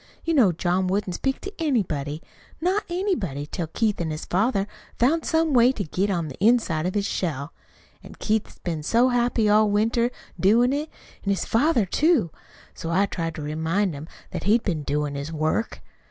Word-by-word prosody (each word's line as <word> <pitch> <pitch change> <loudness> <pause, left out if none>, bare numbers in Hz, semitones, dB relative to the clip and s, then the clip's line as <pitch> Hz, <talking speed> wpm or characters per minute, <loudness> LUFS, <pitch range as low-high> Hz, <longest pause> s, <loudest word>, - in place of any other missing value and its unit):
You 330 - 0
know 245 - +5
John 180 +2 0
wouldn't 190 0 -1
speak 270 +8 -2
to 395 - -7
anybody, 165 - -1 0.4
not 370 +5 0
anybody, 345 - -2
till 165 +2 -4
Keith 210 +3 0
an' 165 - -2
his 155 +1 -5
father 195 +1 +1 0.3
found 300 +7 +2
some 320 -2 +2
way 245 0 +6
to 210 - -3
get 190 +4 -1
on 170 -5 -1
the 145 +6 -7
inside 205 -8 +3
of 185 - -3
his 205 -1 +1
shell. 150 -6 -3 0.5
An' - - -12
Keith's 215 0 -1
been 165 -3 -4
so 235 +11 +3
happy 240 -2 +2
all 210 +1 +4
winter 225 +3 +2 0.3
doin' 235 +7 +4
it; 300 +2 -2 0.3
an' 200 - -2
his 195 - 0
father, 240 -1 +2
too. 280 - +2 0.4
So 165 - -6
I 190 +4 +3
tried 165 -4 -4
to 155 - -6
remind 160 +5 0
him 145 +2 -8 0.2
that - - -5
he'd 220 +4 +3
been 165 -6 -1
doin' 145 0 -1
his 140 +2 -5
work. 155 +7 -1
200 Hz, 185 wpm, -24 LUFS, 165-240 Hz, 0.5 s, way